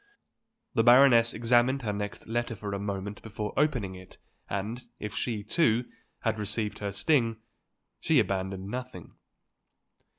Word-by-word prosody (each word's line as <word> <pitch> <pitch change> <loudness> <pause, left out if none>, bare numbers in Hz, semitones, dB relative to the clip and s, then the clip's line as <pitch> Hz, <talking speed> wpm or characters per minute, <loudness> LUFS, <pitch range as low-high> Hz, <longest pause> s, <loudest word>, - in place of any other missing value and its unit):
The 115 - +3
Baroness 120 -1 +7
examined 120 +4 +2
her 105 -2 -1
next 105 0 -5
letter 120 +1 -2
for 100 -1 -5
a 100 - -2
moment 100 0 -4
before 105 -1 -5
opening 125 -11 +1
it 95 0 -13 0.3
and 105 +5 -3 0.2
if 105 0 -5
she, 115 -5 -2
too, 120 - +2 0.4
had 110 - 0
received 105 +1 -2
her 100 -1 -3
sting, 115 - +2 0.6
she 160 - +2
abandoned 95 -3 0
nothing. 125 +3 -7
110 Hz, 135 wpm, -28 LUFS, 100-120 Hz, 0.6 s, Baroness